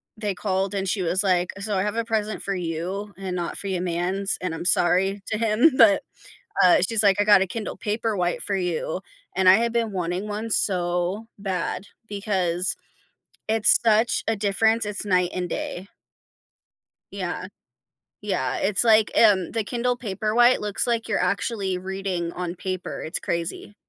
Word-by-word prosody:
they 210 -3 -3
called, 195 0 -1
and 195 -1 -2
she 195 +1 -1
was 180 +3 +1
like, 180 -2 +1
"So 205 0 -3
I 185 - +1
have 210 +1 -2
a 230 0 -1
present 215 -2 -2
for 200 - -2
you 180 +4 -4
and 190 -2 -4
not 175 -1 -3
for 200 - -5
your 185 -2 -2
mans, 185 +3 -1
and 185 -3 -3
I'm 165 - -6
sorry 185 +3 +2
to 215 - -2
him." 230 +7 +4
But, 225 -6 +5 0.6
uh, 180 -1 +6
she's 225 -2 +2
like, 200 -2 +4
"I 205 - +4
got 205 -2 +6
a 190 - +1
Kindle 220 +3 -5
Paperwhite 210 -5 -1
for 200 - -1
you." 180 -1 -2 0.3
And 190 -1 +4
I 190 - +9
had 235 +1 0
been 230 -2 0
wanting 180 +2 -3
1 215 +2 -4
so 180 +2 +1
bad 190 0 -3 0.2
because 190 -3 -1 0.7
it's 220 -1 +5
such 225 +1 +2
a 225 - +1
difference, 215 +2 +1
it's 210 0 -2
night 180 -2 +2
and 180 -1 -3
day. 185 +3 -5 1.2
Yeah, - - -4 0.8
yeah, - - -1
it's 210 - +1
like, 220 -1 +5
um, 200 -6 +4
the 225 -2 -1
Kindle 245 +2 -1
Paperwhite 230 +3 +2
looks 210 +2 -1
like 230 -1 -1
you're 210 - 0
actually 195 0 -1
reading 185 -2 -4
on 180 -1 -4
paper, 185 0 -5
it's 160 - -3
crazy. 170 +4 -4
195 Hz, 170 wpm, -24 LUFS, 180-215 Hz, 1.2 s, I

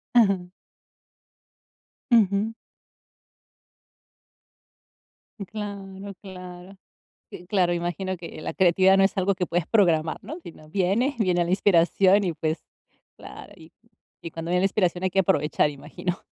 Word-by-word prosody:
Ajá. 195 -6 +4 1.6
Ujú. 215 0 +3 2.9
Claro. 200 -1 -7
Claro. 185 0 -11 0.5
Si, 175 - -11
claro, 180 -3 +1
imagino 175 +2 -3
que 165 -2 -9
la 160 - -4
creatividad 190 +1 +4
no 195 - +5
es 195 - +1
algo 190 +1 +1
que 180 - -1
puedes 170 -1 -1
programar, 165 -7 +2
¿no? 315 +6 -7
Si 170 - -10
no, 155 -1 -17
viene, 200 - +1
viene 180 -4 +2
la 170 - -4
inspiración 190 +1 +4
y, 175 -3 -1
pues 155 +1 -3 0.5
claro, - - -11
y - - -16 0.5
y 165 - -5
cuando 165 +1 -6
viene 180 0 +2
la - - +3
inspiración 185 -2 0
hay 185 - +2
que 195 - +1
aprovechar, 150 -4 +2
imagino. 160 +6 -5
185 Hz, 130 wpm, -25 LUFS, 175-195 Hz, 2.9 s, no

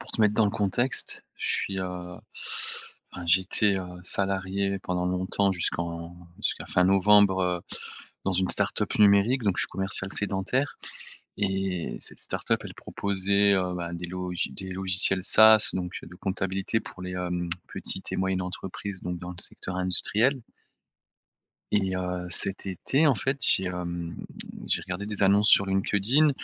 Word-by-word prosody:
pour - - -10
te - - -3
mettre 105 -1 +4
dans 110 0 +4
le - - 0
contexte, 105 +6 +1
je - - -4
suis, 95 -1 0
heu, 90 -1 -6 1.0
enfin 90 -1 -7
j'étais, 95 +3 +3
heu, 95 -1 -4 0.2
salarié 100 0 0
pendant 90 -1 -2
longtemps 95 +2 +1
jusqu'en 85 0 -3 0.3
jusqu'à - - -2
fin 90 - +2
novembre, 100 0 +5
heu, 90 -1 0 0.6
dans 95 - +1
une 95 +1 +1
start-up - - +1
numérique 105 +5 +5
donc 100 -3 +1
je - - +4
suis - - +1
commercial 95 +1 -2
sédentaire 105 +8 -1 0.6
et 95 -3 -2
cette - - -9
start-up - - -1
elle - - -8
proposait, 100 0 +1
heu, 90 -1 -1
ben, 85 -1 -4
des 85 0 -5
logi 90 -1 -3
des 95 -1 -7
logiciels 95 0 +3
SaaS 110 0 +7
donc, 90 -1 -4
heu, - - -10
de 90 - -12
comptabilité 95 +3 -2
pour 95 - -8
les, 90 - -5
hem, 90 -1 -3 0.2
petites - - -5
et - - -1
moyennes 95 0 0
entreprises 95 +1 -6
donc 90 0 -4
dans 90 +1 -7
le 85 - -8
secteur 90 0 -3
industriel. 110 +8 +1 1.3
Et 95 -3 +1
heu, 90 -1 -3
cet 95 +3 -1
été 135 - +1
en 135 - +4
fait 135 +7 -1
j'ai, 95 - +3
hem, 85 -2 -4 0.5
j'ai - - 0
regardé 90 +3 -5
des 105 -1 -2
annonces 100 +2 +4
sur 100 - +6
LinkedIn 100 +9 +2
95 Hz, 160 wpm, -27 LUFS, 90-100 Hz, 1.3 s, SaaS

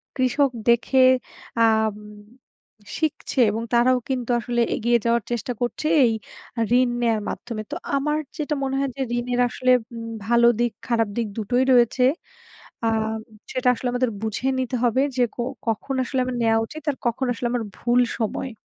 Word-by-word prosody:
কৃষক 260 +2 +2 0.2
দেখে 245 +3 +4 0.6
আম 220 -1 +2 1.0
শিখছে 310 -3 -2
এবং 225 +2 -3
তারাও 250 +2 +4
কিন্তু 250 -2 -1
আসলে 240 +1 -1
এগিয়ে 235 +1 +2
যাওয়ার 235 -1 +2
চেষ্টা 240 +1 -2
করছে 245 +5 -1 0.2
এই 230 - +2 0.7
ঋণ 255 -1 +3
নেয়ার 225 -2 +1
মাধ্যমে। 230 -3 -5
তো - - -2 0.2
আমার 300 +2 0 0.2
যেটা 300 0 -1
মনে 270 0 -1
হয় 275 0 0
যে - - -3 0.2
ঋণের 245 0 -1
আসলে 255 +1 +1 0.2
উম 230 0 -6 0.2
ভালো 235 0 +5
দিক 240 -1 +2 0.2
খারাপ 230 -2 +2 0.3
দিক 225 - -2
টোই 250 +1 +4
রয়েছে। 250 0 +4 0.8
আম 220 0 0 0.3
সেটা 255 -1 0
আসলে 250 - -3
আমাদের 245 -1 +1
বুঝে 220 +4 -2
নিতে 255 -1 -1
হবে 240 +3 +3
যে 250 - +3
কো 240 - -2 0.3
কখন 225 +5 -1
আসলে 260 +1 -1
আমার 255 -1 -3
নেওয়া 225 -1 +3
উচিত 310 +6 -9
আর 280 - -4
কখন 240 +3 0
আসলে 245 +1 -4
আমার 245 -2 0
ভুল 240 +1 +2 0.2
সময়। 230 +3 -2
240 Hz, 165 wpm, -23 LUFS, 230-255 Hz, 1.0 s, ভালো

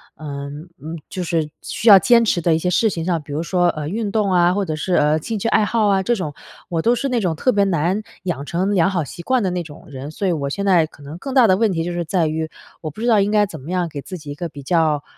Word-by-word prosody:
嗯， 145 +2 -7
呃， 155 - -9 0.2
就 185 - -4
是 160 -3 -1
需 230 - -4
要 200 - +11
坚 235 0 +5
持 185 -5 +1
的 165 0 +2
一 - - +2
些 180 - -1
事 220 +5 +3
情 165 -3 -4
上， 170 -4 0
比 145 - -12
如 150 - -1
说， 175 0 +1
呃， 150 -3 -3
运 210 0 -2
动 210 -2 +1
啊， 175 0 +4
或 205 - 0
者 155 - -3
是， 175 +4 -2
呃， 150 +1 +3
兴 220 +8 -4
趣 225 - -1
爱 220 - +3
好 220 -1 +1
啊 195 -1 +2
这 240 - +1
种， 155 -7 -4 0.4
我 165 -3 -1
都 235 +5 +3
是 275 +3 -2
那 245 - +1
种 175 -4 0
特 255 - 0
别 200 -2 +3
难 180 +3 0 0.2
养 155 -6 -3
成 185 +6 -1
良 185 +1 +4
好 175 -5 -1
习 170 - -9
惯 260 -1 +1
的 185 - +1
那 180 -1 -2
种 150 -3 -13
人。 140 +2 -7
所 195 +4 -2
以 - - +2
我 140 -3 -2
现 200 +7 -3
在 175 -5 +4
可 145 - -17
能 150 +4 -8
更 270 +7 -6
大 255 -4 +6
的 185 - +5
问 220 -2 +2
题 165 -1 -1
就 175 - -3
是 175 - -2
在 165 -1 +1
于， 160 +1 -2 0.3
我 155 - -4
不 180 - -14
知 240 - -1
道 220 -3 +5
应 205 +1 0
该 210 -1 +4
怎 160 -6 -9
么 160 +7 -8
样 180 -2 0
给 145 -2 -6
自 185 - -7
己 150 -2 -9
一 - - -6
个 170 - -4
比 145 -3 -10
较， 155 -1 +1
175 Hz, 325 characters per minute, -20 LUFS, 155-200 Hz, 0.4 s, 要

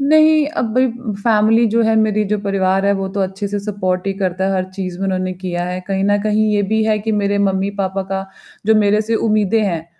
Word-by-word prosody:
नहीं 310 +1 +4
अब 225 -2 -1
भई 255 +1 +4 0.4
फैमिली 225 +1 +3
जो 230 0 +3
है 225 0 +2
मेरी 215 -1 +2
जो 210 +1 -1
परिवार 195 -1 0
है, 200 - +4
वो 195 -1 -3
तो 195 +1 -4
अच्छे 195 +2 -3
से 205 - -2
सपोर्ट 190 -2 -2
ही 195 - 0
करता 190 -1 -1
है 195 - 0
हर 185 -1 0
चीज़ 185 -2 -5
में 195 - -3
उन्होंने 185 -1 -1
किया 180 -1 -4
है। 180 0 -4
कहीं 195 -1 -1
ना 205 0 +3
कहीं 215 +1 +1
ये 205 - +2
भी 220 0 +2
है 215 -1 +1
कि 220 +1 -3
मेरे 205 -1 0
मम्मी-पापा 195 0 -1
का 195 0 -3 0.4
जो 220 - +5
मेरे 210 0 +3
से 225 +2 -2
उम्मीदें 215 -1 +1
हैं, 170 -4 -2
200 Hz, 235 wpm, -18 LUFS, 190-215 Hz, 0.4 s, जो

